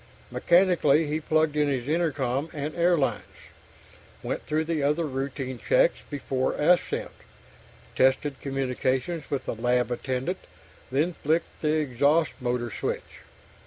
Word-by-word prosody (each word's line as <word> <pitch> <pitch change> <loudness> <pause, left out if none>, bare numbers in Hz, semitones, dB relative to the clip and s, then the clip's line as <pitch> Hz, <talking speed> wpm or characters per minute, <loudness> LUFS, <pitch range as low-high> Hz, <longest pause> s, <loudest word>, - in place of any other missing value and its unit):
Mechanically, 170 -4 +4
he 150 +1 -1
plugged 155 -1 +1
in 150 -1 +2
his 130 -3 -1
intercom 145 -3 0
and 150 0 -4
air 175 0 +3
lines, 140 - 0 1.0
went - - -3
through 155 +1 +1
the 160 -1 -1
other 150 +4 +1
routine 135 -2 -4
checks - - +3
before 135 -2 -1
ascent, 175 +4 +1 0.8
tested 135 +2 +2
communications 135 +3 -2
with 140 - -2
the - - -2
lab 125 +2 +1
attendant, 130 +8 -2 0.5
then 155 +7 +1
flicked 160 +2 -1
the 150 -1 +2
exhaust 145 +3 +2
motor 120 -2 -2
switch. - - -4
145 Hz, 125 wpm, -26 LUFS, 130-160 Hz, 1.0 s, Mechanically